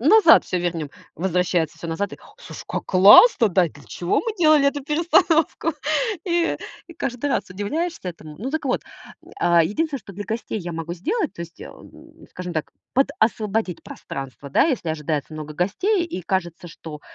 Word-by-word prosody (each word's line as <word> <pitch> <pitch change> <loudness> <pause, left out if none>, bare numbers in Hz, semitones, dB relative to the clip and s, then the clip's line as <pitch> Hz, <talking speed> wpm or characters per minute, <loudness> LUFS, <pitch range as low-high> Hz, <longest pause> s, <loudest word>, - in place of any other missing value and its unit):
назад 330 - +7
всё 180 - -2
вернем. 165 -4 -3 0.2
Возвращается 175 -2 0
всё 170 - -7
назад 175 +5 -3
и: - - -7
"О 420 - -19
слушай, - - -10
как - - -3
классно, 210 - +7
да? 180 -1 +3
И - - -6
для 145 - -16
чего 175 - -1
мы 455 -2 -3
делали 310 -4 +5
эту 285 0 0
перестановку?" 325 +2 +2 0.5
И 340 -1 +1 0.3
и 335 - -12
каждый 250 +3 -3
раз - - -1
удивляешься 230 - -3
этому. 155 -3 -9
Ну, 250 +7 -4
так 310 0 -3
вот. 255 - 0 0.4
М, - - -16
а, 170 -1 +5
единственное, 280 - -1
что 200 - -12
для 205 +3 -6
гостей 225 -1 -3
я 175 -2 -6
могу 165 +1 -5
сделать, 350 - -2
то - - -10
есть, 170 0 -12
эм, - - -14
скажем 180 -1 -6
так, 155 -2 -4 0.2
подосвободить 220 -7 0
пространство, 135 +1 -8
да, - - +4
если 260 - -1
ожидается 155 -1 -3
много 155 -1 -7
гостей, 345 - 0
и 185 - -6
кажется, 175 -2 -3
что 160 -2 -10
195 Hz, 180 wpm, -22 LUFS, -, 0.5 s, назад